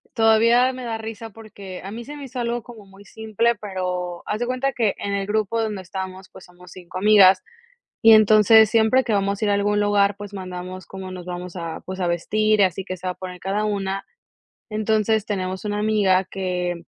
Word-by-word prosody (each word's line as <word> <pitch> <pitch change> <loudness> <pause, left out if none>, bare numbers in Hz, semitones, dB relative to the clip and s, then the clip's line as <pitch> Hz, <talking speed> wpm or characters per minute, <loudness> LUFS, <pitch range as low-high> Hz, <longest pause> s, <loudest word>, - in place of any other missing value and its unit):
todavía 230 +3 +4
me 255 - -8
da 230 -2 -3
risa, 225 0 -7
porque, 200 -4 -11
a 195 - -7
mí 230 +2 -7
se 295 +3 -8
me 285 - -9
hizo 255 -1 -7
algo 235 0 -2
como 230 -4 -13
muy 195 +1 -17
simple, 220 +3 -1
pero 180 -3 -4
haz 215 - -3
de 240 - -2
cuenta 255 +2 -1
que 220 -5 0
en 200 - -4
el 200 -1 -2
grupo 215 +1 0
donde 210 -4 -3
estamos, 190 0 -7
pues, 190 - -14
somos 180 0 -17
5 180 0 -9
amigas, 195 -1 +6 0.6
y 225 - +7
entonces 215 0 +6
siempre 225 +4 +3
que 230 - 0
vamos 200 0 0
a 215 - +1
ir 205 - +2
a - - +3
algún 205 +1 +1
lugar, 205 -1 +2
pues, 205 0 -9
mandamos 185 -1 -7
como 190 0 -8
nos 180 -1 -8
vamos 180 0 -7
a 170 -2 -5
pues 190 0 -6
a 175 - 0
vestir, 215 +5 +1
y - - +6
así 190 0 0
que 185 -1 -6
se 185 - -7
va - - 0
a - - -6
poner 180 -1 -8
cada 195 +3 -2
una. 195 -2 -2 0.7
Entonces, 215 0 0
tenemos 190 -1 -4
una 205 0 -2
amiga 205 -3 +2
que, 180 -2 -3
205 Hz, 215 wpm, -22 LUFS, 185-220 Hz, 0.7 s, y